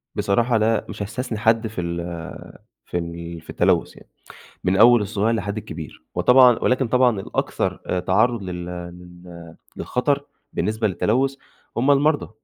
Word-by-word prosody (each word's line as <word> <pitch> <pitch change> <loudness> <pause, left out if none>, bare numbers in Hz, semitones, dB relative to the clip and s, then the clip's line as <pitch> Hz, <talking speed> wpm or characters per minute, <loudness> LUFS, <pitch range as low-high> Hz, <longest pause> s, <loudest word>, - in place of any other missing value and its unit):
بصراحة 115 +4 +1
لأ، 110 0 +1
مش - - -7
هاستثنى 110 +3 -4
حد 110 +1 +2
في 105 -4 -5
ال 85 0 -3 0.9
في - - -3
ال 85 -1 -6
في - - -23
التلوث - - +1
يعني، - - -17 0.5
من 95 +1 +2
أول 120 +2 +7
الصغير 105 +3 0
لحد 100 0 -3
الكبير، 80 -7 -8
وطبعًا 125 -1 +6
ولكن 130 0 +2
طبعًا 125 -3 +3
الأكتر - - -2
آآ 90 - -1
تعرض 110 +4 +1
لل 90 -1 -5
لل 90 -1 -10 0.2
للخطر، 140 +3 -1 0.3
بالنسبة 110 +3 0
للتلوث، 130 +8 0 0.4
هُم 130 +5 +3
المرضى، 145 +2 +2
110 Hz, 145 wpm, -22 LUFS, 90-120 Hz, 0.9 s, أول